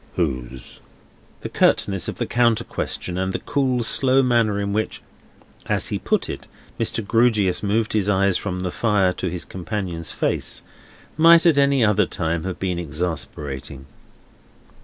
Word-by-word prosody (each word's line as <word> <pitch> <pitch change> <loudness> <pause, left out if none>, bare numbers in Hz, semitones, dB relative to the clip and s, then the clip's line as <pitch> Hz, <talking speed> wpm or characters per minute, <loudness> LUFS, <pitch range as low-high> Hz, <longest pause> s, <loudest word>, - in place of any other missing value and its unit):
"Whose?" 65 -6 -4 0.6
The - - -5
curtness 95 -3 +1
of - - -4
the - - -2
counter 120 -1 +2
question, 90 -5 -3
and 95 0 -1
the - - 0
cool, 130 -4 0
slow 135 +3 +3
manner 115 -5 +2
in 100 0 -2
which, 110 +1 -2 0.7
as - - 0
he - - -2
put - - 0
it, - - -7 0.3
Mr. 115 - -1
Grewgious 110 -5 +2
moved 105 +2 0
his 105 -2 +1
eyes 100 -1 +2
from 90 -1 -3
the 90 -1 -2
fire 100 -5 +2
to 90 - -3
his 90 0 -5
companion's 90 -2 -4
face, - - -2 0.5
might 165 +1 +7
at 160 -4 +5
any 140 -4 +4
other 105 -2 +3
time 80 0 -2
have 95 -2 -4
been 90 -2 -2
exasperating. 75 -5 -4
100 Hz, 155 wpm, -22 LUFS, 90-115 Hz, 0.7 s, might